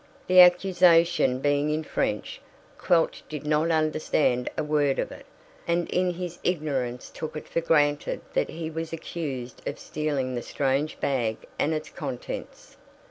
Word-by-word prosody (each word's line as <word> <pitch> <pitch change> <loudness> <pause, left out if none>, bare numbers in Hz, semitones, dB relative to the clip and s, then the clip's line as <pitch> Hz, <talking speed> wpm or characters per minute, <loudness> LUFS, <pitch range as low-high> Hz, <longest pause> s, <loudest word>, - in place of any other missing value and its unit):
The 185 0 +5
accusation 175 -7 +5
being 145 +1 +2
in 155 +1 -1
French, 105 -8 -2 0.4
Quelch 165 -2 +2
did 150 -1 -6
not 155 +2 +2
understand 155 -5 +1
a 155 - 0
word 150 -2 +1
of - - -2
it, - - -12 0.4
and 170 0 +1
in 180 -1 +1
his 175 -1 -6
ignorance 140 -8 -2
took 155 0 -5
it - - -8
for 165 - -1
granted 145 -3 +1
that - - +1
he 160 0 -5
was 165 0 -4
accused 140 -7 -5
of - - -6
stealing 145 -4 -2
the 120 - -2
strange 140 +4 -1
bag 120 -6 0 0.2
and 155 - +2
its 155 -1 -3
contents. 135 -6 -7
155 Hz, 150 wpm, -26 LUFS, 135-165 Hz, 0.4 s, The